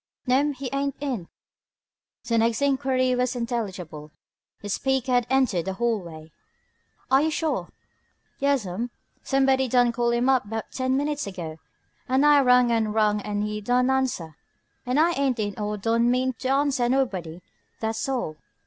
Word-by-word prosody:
"No'm, 280 +3 +2
he 270 0 -6
ain't 275 0 -1
in." 255 -12 -3 1.0
The 230 -2 +1
next 230 +3 +1
enquiry 265 -2 +1
was 250 0 0
intelligible: 190 -11 -4 0.5
the 205 - -8
speaker 265 +4 0
had 245 -1 +2
entered 255 -11 +2
the 190 - -2
hallway. 180 -8 -3 0.8
"Are 265 +1 +6
you 315 - +2
sure?" 315 0 -2 0.7
"Yas'm. 240 -6 0 0.3
Sumbody 270 -1 +2
done 245 0 +4
call 235 0 0
him 240 +1 +1
up 255 -6 +2
'bout 225 0 -3
ten 260 0 0
min'tes 290 -3 -1
ago, 170 -5 -6 0.5
an' 260 +2 +3
I 295 -1 +6
rung 250 -2 +5
an' 225 -2 +1
rung 210 -1 +2
an' 205 0 -2
he 210 0 -3
don' 250 +4 +2
answer. 250 - -1 0.5
He 250 +2 0
ain't 280 -6 +2
in 205 -1 -3
or 210 0 -2
he 205 - -10
don' 230 +1 +2
mean 255 +1 +1
to 260 - -3
answer 270 -3 +2
nobody, 190 -11 -1 0.4
tha's 225 +4 -2
all." 240 -13 -2
245 Hz, 160 wpm, -25 LUFS, 210-265 Hz, 1.0 s, Are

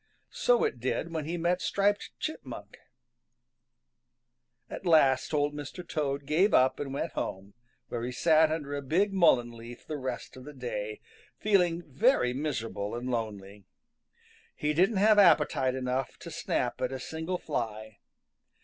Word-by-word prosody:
So 245 -1 +3
it 125 - -1
did 130 +6 -2
when 155 -2 -2
he 170 +3 -3
met 175 +2 0
Striped 200 +4 +1
Chipmunk. - - -6 1.9
At - - -7
last 155 -7 +4
Old 145 -1 +1
Mr. 150 +4 -7
Toad 140 -3 -2
gave 170 +8 +3
up 130 +1 +4
and 140 -2 -4
went 140 - -3
home, 95 +2 -5 0.4
where 120 - -3
he 120 +2 -3
sat 160 +3 +4
under 150 -3 -3
a 145 - -2
big 185 +9 +1
mullein 130 -10 +4
leaf 120 +1 -11
the 155 - -4
rest 130 -3 -5
of 130 - -11
the 150 +2 -10
day, 110 -5 -5 0.4
feeling 180 -5 +2
very 150 - +2
miserable 115 -7 -3
and 125 +2 -4
lonely. 105 -4 -5 0.9
He 150 0 -1
didn't 190 +7 +3
have 210 +1 +5
appetite 150 -8 +4
enough 130 0 -2
to - - -10
snap - - -2
at - - 0
a 130 - -4
single 160 +7 -4
fly. 110 -9 -4
145 Hz, 150 wpm, -29 LUFS, 125-170 Hz, 1.9 s, have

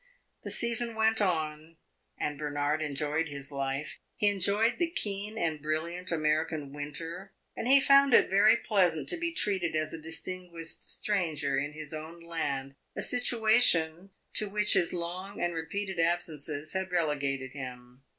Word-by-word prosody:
The - - -5
season 235 0 +1
went 220 0 +2
on, 160 -3 -1 0.4
and 145 -1 -3
Bernard 145 +1 -1
enjoyed 150 +2 -1
his 140 -1 -6
life. 135 +1 -3 0.2
He 205 - +3
enjoyed 205 - +2
the 345 -1 +2
keen 210 - 0
and 160 -6 -1
brilliant 170 +4 -2
American 155 -2 0
winter, 165 +6 -6 0.2
and - - -3
he 275 +2 +8
found 275 0 +6
it - - +6
very 200 +2 +5
pleasant 180 -7 +1
to 355 - 0
be 335 0 -1
treated 190 - 0
as 155 0 -1
a 165 - -6
distinguished 165 +1 -6
stranger 160 -9 0
in 145 +2 -2
his 155 0 -7
own 160 +2 -7
land 140 -5 -3 0.2
a - - 0
situation 215 -8 +2 0.2
to 215 - +2
which 210 +1 +2
his 170 - +3
long 180 +3 -5
and 175 0 0
repeated 190 +3 -4
absences 155 -3 -1
had 190 0 -2
relegated 140 -6 -1
him. 125 -2 -9
165 Hz, 150 wpm, -30 LUFS, 150-200 Hz, 0.4 s, he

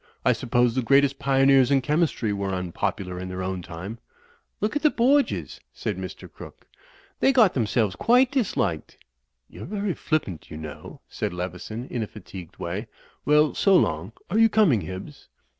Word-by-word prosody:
I - - +5
suppose 120 0 +1
the 130 - 0
greatest 135 +2 +3
pioneers 135 -1 +4
in 140 -1 +4
chemistry 150 -7 0
were 100 -1 -2
un 90 -1 -4
popular 90 -1 -3
in 95 0 -6
their 90 0 -4
own 95 0 -3
time." 90 +7 -8 0.6
"Look 215 +5 -1
at 295 - 0
the 305 - +5
Borgias," 275 +3 +1
said - - -3
Mr. - - -8
Crooke. - - -13 0.5
"They 270 - +4
got 230 -8 +5
themselves 110 -4 0
quite 250 +2 +4
disliked." 195 - -1 0.5
"You're - - -10
very 200 0 -2
flippant, 150 - -3
you 75 - -8
know," 80 -2 -9
said - - -4
Leveson, 90 +6 -5
in 120 - -4
a 110 - -2
fatigued 90 -4 -11
way. - - -4 0.4
"Well, 150 +1 +4
so 195 -1 +3
long. 85 - +1 0.2
Are 215 - +2
you 225 0 +6
coming, 195 - +3
Hibbs?" 95 - -8
125 Hz, 170 wpm, -25 LUFS, -, 0.6 s, you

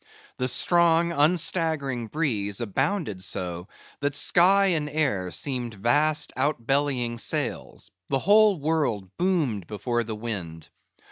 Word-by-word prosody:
The 125 - -1
strong, 170 +3 +3
unstaggering 155 -5 0
breeze 110 -9 -2
abounded 110 - -2
so, 90 -1 -3 0.3
that 145 0 -2
sky 185 +6 +5
and 150 -2 -2
air 135 -12 -1
seemed 120 - -4
vast 145 +9 +1
outbellying 135 -3 -1
sails; - - -4 0.2
the 135 - 0
whole 205 +4 +4
world 130 - -2
boomed 150 - -1
before 120 +3 -2
the 110 -1 -6
wind. 90 -8 -6
135 Hz, 115 wpm, -25 LUFS, 110-160 Hz, 0.3 s, sky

